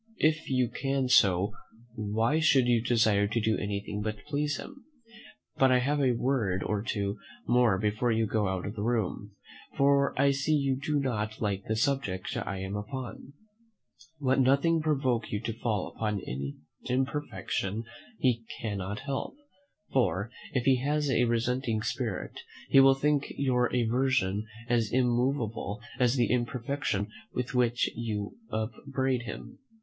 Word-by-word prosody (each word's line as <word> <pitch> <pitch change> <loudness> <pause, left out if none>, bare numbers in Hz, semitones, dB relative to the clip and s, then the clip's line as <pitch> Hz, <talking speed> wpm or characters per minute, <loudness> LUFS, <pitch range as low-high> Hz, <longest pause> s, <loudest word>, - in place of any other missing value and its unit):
"If 155 0 +1
you 130 -2 +2
can 135 +2 -1
so, 95 -5 +4 0.4
why 110 +6 0
should 135 -5 +4
you 120 -2 +3
desire 110 -4 +3
to 115 +3 0
do 110 0 +1
anything 105 0 -3
but 105 -1 -4
please 145 0 -1
him? 275 0 -10 0.7
But 135 -1 +5
I 125 - +6
have 145 +4 +1
a 130 -3 +3
word 115 -7 0
or 105 -1 -1
two 100 -2 -2 0.3
more 120 -5 +4
before 105 +4 0
you 110 0 +2
go 110 -1 0
out 95 -1 -2
of 100 - -4
the 105 - -5
room; 105 -3 -1 0.4
for 140 -1 +3
I 140 0 +5
see 140 +3 +1
you 140 -2 +1
do 145 +2 -1
not 110 -5 -2
like 100 -3 -2
the 110 - -1
subject 110 -6 -1
I 100 - -3
am 95 +1 -4
upon: 130 +5 -6 0.9
let 135 -1 +2
nothing 140 +5 +3
provoke 135 -6 0
you 105 - -1
to 115 -1 -3
fall 110 -4 -2
upon 105 -2 -1
an 70 +3 -5 0.3
imperfection 125 -6 -2 0.3
he 120 -3 +1 0.2
cannot 100 -2 -3
help; 135 - -4 0.6
for, 100 -3 +1 0.2
if 125 - +1
he 135 -1 +5
has 145 +2 0
a 125 - +3
resenting 120 -1 0
spirit, - - -3 0.3
he 135 - +7
will 135 0 +7
think 145 +1 +1
your 125 -3 +2
aversion 115 -4 +1 0.2
as 115 -3 +1
immovable 120 -4 0 0.2
as 125 0 +3
the 120 -3 +2
imperfection 125 -4 -1 0.3
with 125 +1 -2
which 120 -1 +2
you 105 -3 -3 0.2
upbraid 130 +3 -1
him. 105 - -8
120 Hz, 150 wpm, -29 LUFS, 105-135 Hz, 0.9 s, he